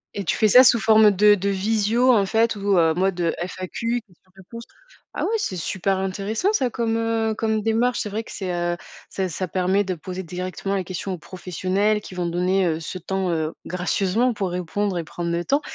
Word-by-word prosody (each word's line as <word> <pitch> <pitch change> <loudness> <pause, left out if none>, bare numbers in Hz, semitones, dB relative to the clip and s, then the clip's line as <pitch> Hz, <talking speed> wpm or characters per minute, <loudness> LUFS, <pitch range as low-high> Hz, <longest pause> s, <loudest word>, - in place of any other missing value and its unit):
Et 200 - -3
tu - - +1
fais 215 - +4
ça 250 +5 +8
sous 240 -2 +5
forme 220 -1 +6
de 205 +1 +5
de 200 0 0
visio 220 +5 +2
en 205 -4 +3
fait 225 +2 +2
ou 200 -1 +1
heu, 165 -2 +4
mode 180 -1 0
FAQ 185 +7 -3
question 185 -1 -28
réponse 230 +5 -10 0.5
ah - - -2
ouais - - -1
c'est 190 - -3
super 190 +3 -1
intéressant 205 - -1
ça 260 - +1
comme, 230 -2 -1
heu, 225 -1 0
comme 220 -1 0
démarche. 230 +3 +1
C'est 210 - -3
vrai 220 +3 -3
que - - -12
c'est, 190 -2 -4
heu, 175 0 -1 0.3
ça 190 -1 -2
ça 185 +3 -3
permet 190 +3 +1
de 185 -1 -2
poser 185 +3 -6
directement 185 +3 -4
les 190 - -1
questions 185 +1 -5
aux 180 - -5
professionnels 185 +5 -1
qui 190 - -11
vont 180 -1 -2
donner, 180 +2 +1
heu, 160 -2 0
ce 175 +3 -6
temps, 190 +1 -2
heu, 160 -1 -1
gracieusement 195 +7 0
pour 195 -3 -2
répondre 180 +2 -2
et - - -3
prendre 170 +2 -4
le 170 0 -2
temps 285 +2 +2
195 Hz, 215 wpm, -23 LUFS, 180-220 Hz, 0.5 s, ça